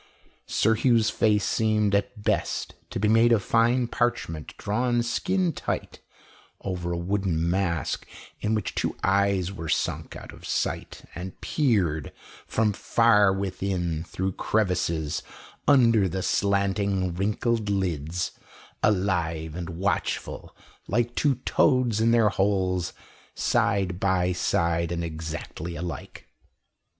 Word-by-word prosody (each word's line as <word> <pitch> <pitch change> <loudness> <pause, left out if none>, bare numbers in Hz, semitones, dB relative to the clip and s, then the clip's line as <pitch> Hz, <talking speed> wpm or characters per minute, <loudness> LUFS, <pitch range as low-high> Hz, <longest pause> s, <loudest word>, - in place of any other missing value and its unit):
Sir 110 - +3
Hugh's 115 -1 +3
face 105 -2 +2
seemed, 110 -2 +1
at 105 +1 -1
best, - - -1 0.2
to - - -4
be 105 - +2
made 115 +2 +5
of 110 -4 +3
fine 120 +3 +3
parchment 120 -11 -2
drawn 120 +3 0
skin 180 +9 0
tight - - -4 0.6
over 90 -3 -3
a 85 - -1
wooden 85 -2 0
mask, 85 -3 -1 0.3
in 110 +1 0
which 105 -3 -2
two - - -2
eyes 95 -1 +2
were 85 -5 -6
sunk - - -1
out - - -9
of - - -14
sight, - - -3
and 90 +1 -7
peered 95 - 0 0.4
from 110 -2 +1
far 105 -2 +4
within 95 -4 -2
through 95 +2 -2
crevices 85 -7 0 0.5
under 115 -8 +5
the 95 +1 -3
slanting, 100 -2 +1
wrinkled 105 +4 0
lids, 90 -3 -1 0.5
alive 85 -6 0
and 85 0 -5
watchful 90 +4 -2 0.3
like 120 0 0
two 145 0 +2
toads 120 -4 +3
in 115 - +4
their 115 -2 +5
holes, 95 -3 0 0.4
side 95 -2 +1
by 95 -2 +2
side 85 -1 0
and 85 0 -2
exactly 80 +1 -5
alike. 85 +1 -7
100 Hz, 120 wpm, -26 LUFS, 85-110 Hz, 0.6 s, made